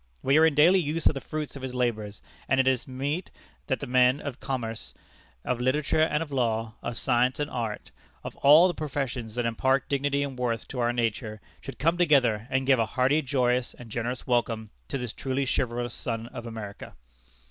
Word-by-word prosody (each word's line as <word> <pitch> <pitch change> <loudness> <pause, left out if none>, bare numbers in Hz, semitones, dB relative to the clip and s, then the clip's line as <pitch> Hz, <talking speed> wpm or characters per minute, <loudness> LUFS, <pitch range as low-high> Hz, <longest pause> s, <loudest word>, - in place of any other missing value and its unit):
We 140 +3 +4
are 160 - +7
in 155 - 0
daily 170 +6 +6
use 160 0 -2
of - - +5
the 135 - -5
fruits 155 -2 -5
of 140 - -8
his 130 -1 -5
labors; 110 -4 -2 0.3
and 135 - +3
it 130 - +3
is 130 -2 +1
meet 140 +7 -3 0.4
that 130 - -1
the - - -3
men 125 +1 +4
of 140 -3 -6
commerce, 115 -5 -5 0.5
of 125 -1 -1
literature 150 +5 +1
and 155 0 +2
of 150 - -12
law, 115 -4 0
of 120 0 -4
science 125 +3 +1
and 145 0 -2
art 115 -3 -4 0.3
of - - -7
all 150 +6 +7
the 180 - -1
professions 135 -7 -4
that 120 -1 -1
impart 130 +4 +1
dignity 140 0 0
and 135 -3 -5
worth 115 -3 -1
to 130 - -5
our 120 0 +2
nature 115 -2 -2 0.2
should 135 - -8
come 165 +4 +1
together 125 -10 +3
and 130 0 0
give 135 -2 +4
a 115 - +2
hearty, 135 +5 +3
joyous, 125 -3 0
and 120 -3 -12
generous 120 +3 -3
welcome 115 -3 0 0.2
to - - -3
this 125 -3 -5
truly 135 +1 -2
chivalrous 120 -2 -1
son 115 -2 -4
of 120 - -8
America." 110 -3 -8
130 Hz, 200 wpm, -27 LUFS, 120-140 Hz, 0.5 s, are